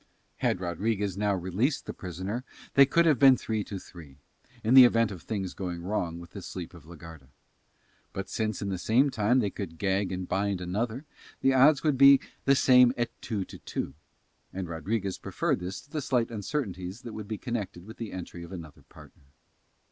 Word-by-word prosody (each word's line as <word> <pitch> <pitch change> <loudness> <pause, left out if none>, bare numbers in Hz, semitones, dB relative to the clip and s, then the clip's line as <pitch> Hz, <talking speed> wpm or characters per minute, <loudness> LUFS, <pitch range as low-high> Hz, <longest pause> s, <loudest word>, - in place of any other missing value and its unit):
Had - - 0
Rodriguez 95 +2 -1
now 100 0 +1
released 95 - -1
the - - -5
prisoner 95 +6 -5 0.3
they 140 -1 +7
could 170 +5 +3
have 150 -7 +4
been 135 -2 +7
three 110 -2 -2
to 100 - -6
three, 80 -7 -13 0.5
in 115 - +2
the 130 -1 +11
event 115 -3 +4
of 90 -4 -8
things 95 -4 -4
going 90 -3 -5
wrong 90 -4 -2
with 85 -1 -12
the - - -8
sleep 90 -2 -7
of 85 -3 -14
la 85 - -10
Garda; 80 -4 -12 0.8
but, 95 -1 -5
since 110 -2 -2
in 100 - -2
the 95 -2 -3
same 130 +8 +3
time 110 +3 +2
they 105 -6 +1
could 85 -6 -6
gag 95 0 0
and 90 -1 -4
bind 100 0 0
another, 110 - -3 0.4
the 135 - +4
odds 135 +2 +5
would 150 -5 +1
be 140 0 +9 0.3
the 140 - +5
same 125 -2 +6
at 120 -1 -1
two 105 -5 -3
to - - -12
two, - - -4 0.6
and 95 -1 -5
Rodriguez 95 +4 -3
preferred - - -1
this 90 +2 -5
to 145 - -24
the 155 - -2
slight 125 -4 0
uncertainties 105 - -4
that 115 - -7
would 110 -2 -7
be 110 0 -4
connected 100 -8 -5
with 110 +2 -11
the 115 -3 -6
entry 90 -1 -7
of 85 - -11
another 80 -6 -9
partner. 70 - -16
100 Hz, 200 wpm, -28 LUFS, 90-120 Hz, 0.8 s, the